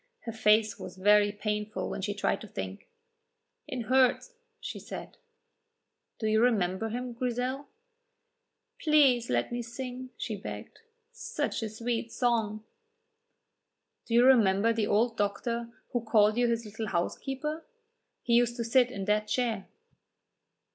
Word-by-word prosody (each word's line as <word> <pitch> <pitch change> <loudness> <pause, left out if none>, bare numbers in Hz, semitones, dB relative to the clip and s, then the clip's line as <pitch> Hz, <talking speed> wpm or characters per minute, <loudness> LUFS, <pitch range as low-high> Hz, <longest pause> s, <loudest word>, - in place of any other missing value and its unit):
Her 230 - -5
face 215 -1 +3
was 185 0 -8
very 205 +1 +5
painful 210 -1 -3
when - - -4
she 205 +1 -2
tried 205 - 0
to - - -8
think. - - -7 0.8
"It 255 - -4
hurts," 260 - +2 0.3
she - - -6
said. - - -8 1.0
"Do 220 - -4
you 220 0 +3
remember 220 -3 +1
him, 245 +2 -4
Grizel?" 250 +3 -2 1.1
"Please 275 -7 +4
let - - 0
me 240 0 -2
sing," 250 +2 -6
she 220 - -3
begged, 200 - -8 0.3
"such 470 - -3
a 220 - -3
sweet 230 +1 -3
song!" 225 -4 0 1.4
"Do 230 - 0
you 240 +1 +6
remember 225 -4 +5
the 220 -2 0
old 230 +2 +2
doctor 230 +3 -1 0.2
who 240 - 0
called 215 -2 +4
you 245 0 +2
his 230 -1 -1
little 220 +1 -5
housekeeper? 270 - -3 0.6
He 235 - 0
used 240 0 +4
to 240 - -2
sit 245 +2 +3
in 200 -6 -5
that 210 +1 +1
chair." 225 -6 -1
230 Hz, 140 wpm, -29 LUFS, 210-245 Hz, 1.4 s, you